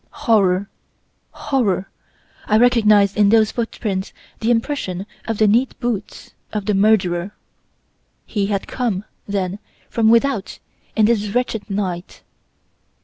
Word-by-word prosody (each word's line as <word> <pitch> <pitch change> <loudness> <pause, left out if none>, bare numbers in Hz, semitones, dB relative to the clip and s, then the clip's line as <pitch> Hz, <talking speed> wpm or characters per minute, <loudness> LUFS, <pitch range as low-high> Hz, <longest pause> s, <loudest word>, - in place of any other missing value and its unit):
Horror! 200 -5 +3 0.6
Horror! 200 -9 -1 0.6
I 215 - +4
recognised 215 -4 +4
in 205 -1 +4
those 220 -1 +4
footprints 210 -4 -3 0.3
the 225 - -1
impression 230 -6 -1 0.2
of 225 -2 -1
the 215 - +4
neat 235 +6 +2
boots 225 -4 -4 0.2
of 210 -2 -3
the 210 - +1
murderer! 195 -2 +2 0.9
He 200 -2 -1
had 200 -2 -2
come, 215 -6 -2 0.2
then, 195 -1 -2 0.3
from 225 -1 +3
without 235 -2 +2 0.4
in 220 - +4
this 210 -2 +1
wretched 225 -1 -2
night. 185 -3 -4
210 Hz, 120 wpm, -20 LUFS, 195-230 Hz, 0.9 s, I